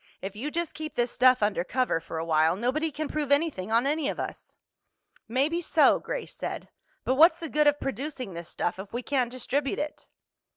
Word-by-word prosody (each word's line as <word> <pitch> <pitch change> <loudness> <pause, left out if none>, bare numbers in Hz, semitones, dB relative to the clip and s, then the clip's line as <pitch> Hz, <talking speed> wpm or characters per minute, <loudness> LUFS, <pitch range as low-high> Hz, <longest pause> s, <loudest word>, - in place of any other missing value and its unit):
If 195 +1 -6
you 255 +8 -3
just 340 +1 -2
keep 310 0 -6
this 240 0 +1
stuff 255 -3 +4
undercover 205 +1 0
for 165 0 -7
a 160 - -2
while, 160 +1 +3
nobody 260 +10 0
can 305 +2 -3
prove 295 -2 -3
anything 285 - +1
on 230 +3 +3
any 295 0 0
of - - -4
us." - - -6 0.7
"Maybe 280 +9 +1
so," - - +4
Grace - - -5
said. - - -5 0.3
"But 260 - +1
what's 325 +2 +7
the 330 - -4
good 300 +1 +3
of 290 0 +3
producing 270 -6 -4
this 170 0 -7
stuff 175 +2 -2
if 195 +1 -8
we 240 +1 -3
can't 255 -3 0
distribute 265 +2 -1
it?" 300 0 -5
260 Hz, 200 wpm, -27 LUFS, 210-300 Hz, 0.7 s, what's